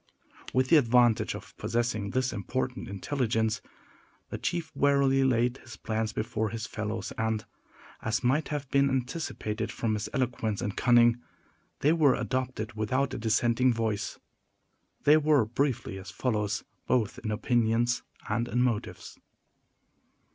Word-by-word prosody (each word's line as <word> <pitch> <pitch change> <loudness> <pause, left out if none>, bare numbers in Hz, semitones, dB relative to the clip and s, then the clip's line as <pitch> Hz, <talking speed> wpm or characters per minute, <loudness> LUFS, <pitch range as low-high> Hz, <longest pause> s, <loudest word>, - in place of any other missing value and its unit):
With 130 0 +1
the 165 - +7
advantage 120 -4 +3
of - - -11
possessing 110 -2 -1
this 130 +1 0
important 125 +5 -3
intelligence, 110 +1 -1 0.7
the - - -4
chief 170 -2 -2
warily 140 -1 +3
laid 125 0 +2
his 120 -4 -12
plans 110 0 -2
before 110 0 -2
his 110 +1 -4
fellows, 110 0 -4
and, 110 -1 -1 0.6
as 110 +3 -1
might 135 +6 +2
have 145 -2 -3
been 140 0 +4
anticipated 125 -5 -3
from 115 -2 -1
his 105 0 -3
eloquence 120 -6 -1
and 100 - -3
cunning, 120 -1 +4 0.6
they 150 +3 +4
were 150 -6 +4
adopted 125 -1 -3
without 130 +6 0
a - - -4
dissenting 115 +3 +2
voice. 110 -2 -2 0.9
They 150 +2 +7
were, 150 -5 +3
briefly, 120 -4 -1
as 95 - -9
follows, 105 -4 -1 0.2
both 115 -5 +1
in 110 - -4
opinions 120 +2 +1 0.3
and 115 +2 0
in 125 +1 +1
motives. 120 -4 -3
120 Hz, 135 wpm, -29 LUFS, 110-130 Hz, 0.9 s, the